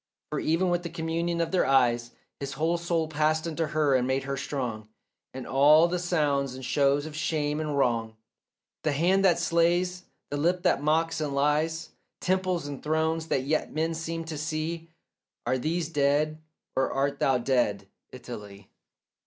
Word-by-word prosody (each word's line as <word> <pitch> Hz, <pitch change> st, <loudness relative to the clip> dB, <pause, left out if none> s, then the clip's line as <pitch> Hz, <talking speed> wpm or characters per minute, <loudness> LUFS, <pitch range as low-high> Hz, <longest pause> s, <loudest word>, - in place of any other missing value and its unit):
For -, -, -1 dB
even 170 Hz, +3 st, +1 dB
with 175 Hz, 0 st, +1 dB
that 170 Hz, -1 st, -8 dB
communion 170 Hz, +1 st, -1 dB
of 165 Hz, -, -1 dB
their 185 Hz, -6 st, +2 dB
eyes 120 Hz, -3 st, +3 dB, 0.3 s
His 140 Hz, 0 st, -4 dB
whole 165 Hz, +5 st, 0 dB
soul 170 Hz, -2 st, 0 dB
passed 155 Hz, +1 st, +1 dB
into 165 Hz, -1 st, -2 dB
her 150 Hz, -2 st, +2 dB
and 125 Hz, -1 st, +2 dB
made 130 Hz, +1 st, 0 dB
her 140 Hz, 0 st, -3 dB
strong; 120 Hz, -6 st, -4 dB, 0.4 s
And 130 Hz, -1 st, -7 dB
all 150 Hz, +5 st, +6 dB
the 180 Hz, +1 st, -1 dB
sounds 145 Hz, -7 st, 0 dB
and 130 Hz, 0 st, -7 dB
shows 140 Hz, +2 st, +2 dB
of 155 Hz, -1 st, -8 dB
shame 150 Hz, -1 st, -1 dB
and 150 Hz, -2 st, -2 dB
wrong, 115 Hz, -4 st, +1 dB, 0.7 s
The 155 Hz, -, 0 dB
hand 180 Hz, +7 st, +3 dB
that 175 Hz, -3 st, +5 dB
slays, 175 Hz, +2 st, +1 dB, 0.3 s
the 145 Hz, -, -1 dB
lip 175 Hz, +4 st, +1 dB
that 175 Hz, -6 st, +2 dB
mocks 160 Hz, +2 st, +1 dB
and 145 Hz, -2 st, -2 dB
lies, 150 Hz, +3 st, +1 dB, 0.3 s
Temples 185 Hz, -3 st, 0 dB
and 145 Hz, -2 st, -6 dB
thrones 160 Hz, +1 st, 0 dB
that 135 Hz, -, 0 dB
yet 155 Hz, +3 st, -1 dB
men 160 Hz, +2 st, 0 dB
seem 165 Hz, 0 st, -4 dB
to 160 Hz, -2 st, -5 dB
see— 160 Hz, +2 st, -3 dB, 0.6 s
Are 130 Hz, -, +1 dB
these 160 Hz, +4 st, -1 dB
dead 150 Hz, 0 st, +1 dB, 0.3 s
or 130 Hz, 0 st, +1 dB
art 140 Hz, +1 st, -1 dB
thou 135 Hz, -1 st, +3 dB
dead, 120 Hz, -6 st, 0 dB, 0.2 s
Italy? 105 Hz, -6 st, -10 dB
155 Hz, 170 wpm, -27 LUFS, 135-165 Hz, 0.7 s, all